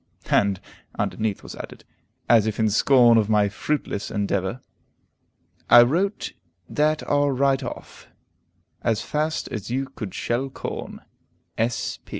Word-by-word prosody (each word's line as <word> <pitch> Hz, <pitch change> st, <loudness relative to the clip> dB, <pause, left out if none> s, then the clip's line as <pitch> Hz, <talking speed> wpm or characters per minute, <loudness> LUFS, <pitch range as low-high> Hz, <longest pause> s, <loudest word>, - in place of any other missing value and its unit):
And 100 Hz, -2 st, +3 dB, 0.4 s
underneath 110 Hz, -2 st, -2 dB
was -, -, -9 dB
added, -, -, -9 dB, 0.4 s
as 110 Hz, -2 st, +5 dB
if 110 Hz, -, -3 dB
in 110 Hz, -1 st, +2 dB
scorn 120 Hz, +1 st, +5 dB
of 105 Hz, -1 st, 0 dB
my 105 Hz, -2 st, +3 dB
fruitless 125 Hz, -1 st, -3 dB
endeavor: 100 Hz, +2 st, -1 dB, 1.1 s
"I 120 Hz, -, +10 dB
wrote 180 Hz, -, -1 dB, 0.3 s
that 155 Hz, +1 st, +1 dB
are 145 Hz, 0 st, +2 dB
right 135 Hz, 0 st, +2 dB
off, 125 Hz, -, -8 dB, 0.7 s
as 115 Hz, -2 st, 0 dB
fast 155 Hz, +1 st, -2 dB
as 110 Hz, -3 st, -6 dB
you 130 Hz, +3 st, -1 dB
could 105 Hz, -7 st, -7 dB
shell 125 Hz, +3 st, -1 dB
corn. -, -, -6 dB
120 Hz, 125 wpm, -24 LUFS, 105-140 Hz, 1.1 s, I